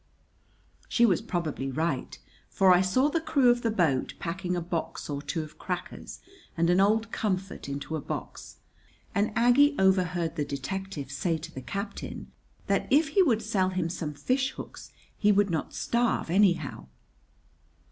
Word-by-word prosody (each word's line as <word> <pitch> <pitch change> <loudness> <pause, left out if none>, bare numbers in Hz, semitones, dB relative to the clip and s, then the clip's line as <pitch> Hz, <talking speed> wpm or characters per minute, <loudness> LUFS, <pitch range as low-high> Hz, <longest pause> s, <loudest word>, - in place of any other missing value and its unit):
She 235 - +4
was 190 -7 +2
probably 155 -6 -3
right, 145 -1 -2 0.3
for 190 -1 +5
I 180 - +5
saw 225 +9 +2
the 325 +2 0
crew 275 -6 +4
of 240 0 0
the 230 - +1
boat 165 -11 +1
packing 180 +1 -3
a - - 0
box 165 -3 -4
or 140 0 -3
two 160 +2 -3
of 155 - -13
crackers 180 -1 -6 0.4
and 170 +1 +3
an 180 - +4
old 220 +3 +2
comfort 190 -7 -3
into 140 +3 -4
a 155 - -3
box; - - -7 0.6
and 205 +2 +1
Aggie 245 +5 +5
overheard 180 -3 +2
the 150 - +1
detective 145 +1 -5
say 165 +3 0
to 165 +1 -9
the 130 - -6
captain 200 - -6 0.3
that - - 0
if 295 +2 +4
he 345 +6 +4
would 230 - +2
sell 195 -4 +1
him 185 -3 -1
some 155 -4 -4
fishhooks 255 - -3 0.3
he 210 -1 +4
would 205 -1 +3
not 160 - -2
starve 235 -7 0
anyhow. 175 - +2
185 Hz, 160 wpm, -28 LUFS, 165-220 Hz, 0.6 s, for